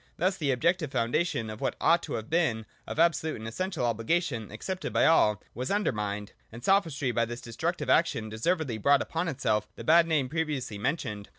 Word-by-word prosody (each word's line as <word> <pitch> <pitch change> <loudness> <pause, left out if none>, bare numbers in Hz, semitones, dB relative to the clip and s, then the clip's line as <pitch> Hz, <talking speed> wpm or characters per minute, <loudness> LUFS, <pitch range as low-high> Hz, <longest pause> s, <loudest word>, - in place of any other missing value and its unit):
Thus 185 +3 +1
the 155 -7 -2
objective 155 +4 +1
foundation 120 0 0
of 110 - -9
what - - -1
ought 170 +1 +4
to - - -3
have 110 0 -4
been 150 -10 +1 0.2
of - - -5
absolute 160 -1 +2
and 110 0 -7
essential 155 +2 -2
obligation, 115 - -1
accepted 185 - -5
by - - +3
all, 105 -10 +4
was 125 +3 -4
undermined: 105 - -1 0.2
and 115 +2 -10
Sophistry 165 -9 +2
by 115 0 +1
this 120 +1 -6
destructive 115 -2 -3
action 110 -1 +2
deservedly 120 +2 -1
brought 140 +5 +4
upon 165 +2 -3
itself 110 -8 0
the - - -8
bad 165 +1 +5
name 150 -5 +1
pre 160 +4 0
viously 130 -9 -4
mentioned. 105 -6 -3
135 Hz, 190 wpm, -28 LUFS, 110-165 Hz, 0.2 s, bad